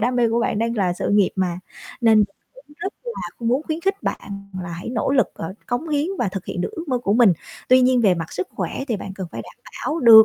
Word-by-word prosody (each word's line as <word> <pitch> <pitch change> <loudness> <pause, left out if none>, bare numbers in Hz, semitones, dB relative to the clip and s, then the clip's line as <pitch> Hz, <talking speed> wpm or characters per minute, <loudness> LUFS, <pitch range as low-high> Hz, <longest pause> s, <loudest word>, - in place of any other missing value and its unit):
đam 245 +3 +1
mê 235 -1 +4
của 230 +1 +1
bạn 220 - 0
đang 230 +1 0
là 185 -4 +2
sự 175 - -2
nghiệp 205 -2 +4
mà, 180 -2 0 0.4
nên 225 -2 +6
mình 210 - +6 0.4
cũng 295 - -18
rất 385 +3 -3
là 475 -1 -4 0.2
muốn 255 +5 +2
khuyến 315 +1 -3
khích 390 +2 0
bạn 200 -1 -5
là 175 - -6
hãy 170 +4 -6
nỗ 235 +1 0
lực, 270 -2 +4
ờ, 165 +3 -5
cống 245 +7 -2
hiến 295 0 +1
và 230 - +1
thực 190 -1 -5
hiện - - -4
được - - -1
ước 335 -5 -6
mơ 255 -2 +1
của 205 -4 0
mình. 230 -5 +7 0.4
Tuy 255 0 +7
nhiên 255 0 +4
về 200 -5 +5
mặt 165 -2 -5
sức 180 - -3
khỏe 190 +8 -3
thì 230 - +1
bạn 195 0 -6
cần 190 -2 -5
phải - - -5
đảm - - -14 0.3
bảo 310 - -1
được 225 -4 +10
230 Hz, 270 wpm, -22 LUFS, 195-260 Hz, 0.4 s, được